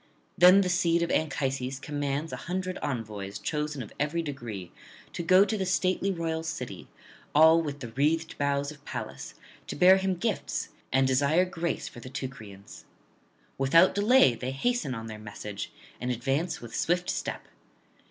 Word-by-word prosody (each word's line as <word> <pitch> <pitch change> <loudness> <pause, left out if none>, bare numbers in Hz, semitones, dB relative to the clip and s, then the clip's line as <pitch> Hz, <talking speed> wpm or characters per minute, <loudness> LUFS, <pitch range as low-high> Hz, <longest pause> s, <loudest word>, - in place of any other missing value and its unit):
Then 180 +3 +7
the 190 - 0
seed 170 -1 +2
of 170 - -1
Anchises 135 -3 -1
commands 145 +1 -3
an - - -5
hundred 185 +1 -3
envoys 105 -7 -4
chosen 150 -3 -3
of 105 - -12
every 150 +4 0
degree 120 - -6 0.4
to - - -3
go 185 +4 +6
to 210 - -1
the 195 - -1
stately 185 +1 +1
royal 165 -3 -2
city, 130 - -6 0.5
all 160 +2 +7
with 145 -3 -5
the 120 - -6
wreathed 155 +7 0
boughs 140 0 0
of 145 -1 -14
Pallas, 120 -6 -6 0.3
to - - -5
bear 185 +5 +7
him 190 -1 0
gifts 210 +3 -2 0.2
and 135 +1 +3
desire 140 +7 +3
grace 170 -2 -3
for - - -10
the 130 - -9
Teucrians. 110 -7 -8 0.7
Without 165 +7 +5
delay 205 - +5
they 125 +2 -5
hasten 150 - -1
on 115 -1 -6
their 110 -1 -7
message, 105 -1 -7 0.3
and 125 - -3
advance 135 +8 -1
with 120 -1 -8
swift 180 +1 0
step. - - -3
145 Hz, 160 wpm, -28 LUFS, 125-175 Hz, 0.7 s, Then